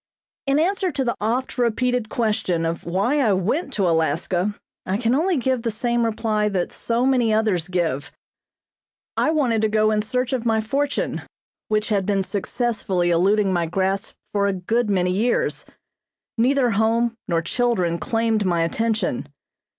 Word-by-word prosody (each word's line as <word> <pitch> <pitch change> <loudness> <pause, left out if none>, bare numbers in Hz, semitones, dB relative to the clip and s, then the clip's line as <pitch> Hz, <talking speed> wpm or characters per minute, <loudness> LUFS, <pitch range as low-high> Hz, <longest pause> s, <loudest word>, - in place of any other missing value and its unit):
In 275 +1 +3
answer 370 +3 +1
to 270 - 0
the 235 - 0
oft 245 +4 -1
repeated 245 -1 +1
question 210 -8 0
of 165 0 -3
why 200 - +1
I 225 -7 +3
went 230 - -1
to 195 -5 +1
Alaska 175 +4 0 0.3
I 190 +2 -1
can 230 +1 +1
only 335 +5 +2
give 260 -1 0
the 230 - -1
same 235 +2 0
reply 215 -1 0
that 185 -3 -1
so 235 +2 0
many 250 -4 +3
others 215 -6 +1
give: 170 -3 -1 1.0
I - - +2
wanted 260 -8 +1
to 220 - +2
go 215 0 +3
in 210 0 +2
search 250 +4 -1
of 250 -3 -1
my 225 -2 +2
fortune 275 +6 -1 0.5
which 215 0 0
had 200 -3 0
been 200 -2 +1
successfully 200 -3 -1
eluding 195 +3 +3
my 170 -2 0
grasp 190 +3 -1 0.2
for 200 -1 +1
a 200 - +1
good 215 +5 0
many 180 -2 +1
years. 225 +6 0 0.7
Neither 250 +1 +2
home 225 +3 +2
nor 165 -2 0
children 180 -5 0
claimed 225 -2 0
my 170 -3 +1
attention. 215 - -1
215 Hz, 160 wpm, -22 LUFS, 190-240 Hz, 1.0 s, In